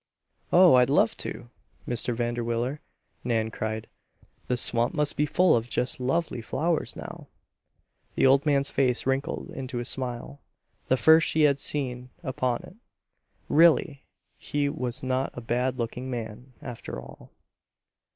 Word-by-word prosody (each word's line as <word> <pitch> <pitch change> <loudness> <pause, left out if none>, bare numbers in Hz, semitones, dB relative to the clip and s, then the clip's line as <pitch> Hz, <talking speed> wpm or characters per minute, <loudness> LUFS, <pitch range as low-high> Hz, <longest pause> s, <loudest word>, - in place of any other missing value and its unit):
"Oh! 180 0 +7
I'd 125 0 +5
love 140 -5 +3
to, 120 - -6 0.4
Mr. 120 0 0
Vanderwiller," 120 +3 -2 0.4
Nan 110 -2 0
cried. 110 0 -4 0.6
"The 125 - 0
swamp 120 -1 0
must 150 -1 +1
be 150 - +1
full 180 +4 +4
of 115 +1 -2
just 125 +3 -1
lovely 135 0 -1
flowers 160 +8 -1
now." - - -9 0.9
The - - +3
old 135 +1 +5
man's 140 -2 +1
face 125 -3 +1
wrinkled 135 +2 -2
into 130 -1 -6
a 120 - -3
smile, 130 +2 -5 0.5
the 130 - +3
first 160 +4 +6
she 160 - +1
had 140 -2 +4
seen 125 -4 -2
upon 130 -3 -1
it. 185 - -14 0.7
Really! 155 -3 +3 0.3
He 145 -1 -1
was 125 -2 -2
not 130 +1 0
a - - -2
bad 125 +3 -1
looking 125 +2 -4
man, 120 +1 -6
after 120 - -7
all. - - -13
130 Hz, 140 wpm, -27 LUFS, 120-140 Hz, 0.9 s, Oh